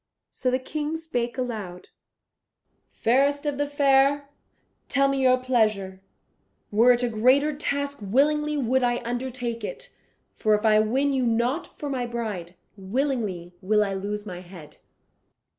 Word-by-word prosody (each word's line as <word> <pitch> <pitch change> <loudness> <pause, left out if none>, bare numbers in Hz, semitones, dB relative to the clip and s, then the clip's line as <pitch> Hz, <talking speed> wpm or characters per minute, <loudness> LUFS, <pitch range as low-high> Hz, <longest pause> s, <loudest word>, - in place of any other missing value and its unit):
So 255 - -1
the 255 - +2
King 295 +4 -4
spake 245 -7 -3
aloud, 210 -8 -5 1.0
"Fairest 280 +5 +1
of 290 -1 -2
the 290 - +1
fair, 280 0 +3 0.6
tell 275 0 +3
me 275 0 0
your 255 -1 +5
pleasure; 215 -7 0 0.7
were 230 +4 +5
it 245 0 -1
a - - +2
greater 260 +7 +3
task 285 -1 -2
willingly 300 +8 +1
would 260 -1 +1
I 245 0 0
undertake 245 -1 -3
it, - - -7 0.4
for 215 -1 +2
if 210 +2 -2
I 215 -1 +5
win 265 +6 +1
you 265 - +1
not 240 +7 0
for 295 - -8
my 255 -3 -2
bride, 210 -7 -5 0.2
willingly 200 -4 -2
will 210 +2 +3
I 200 -1 -2
lose 205 +2 -4
my 180 -3 -7
head." 175 -5 -13
245 Hz, 145 wpm, -25 LUFS, 215-280 Hz, 1.0 s, your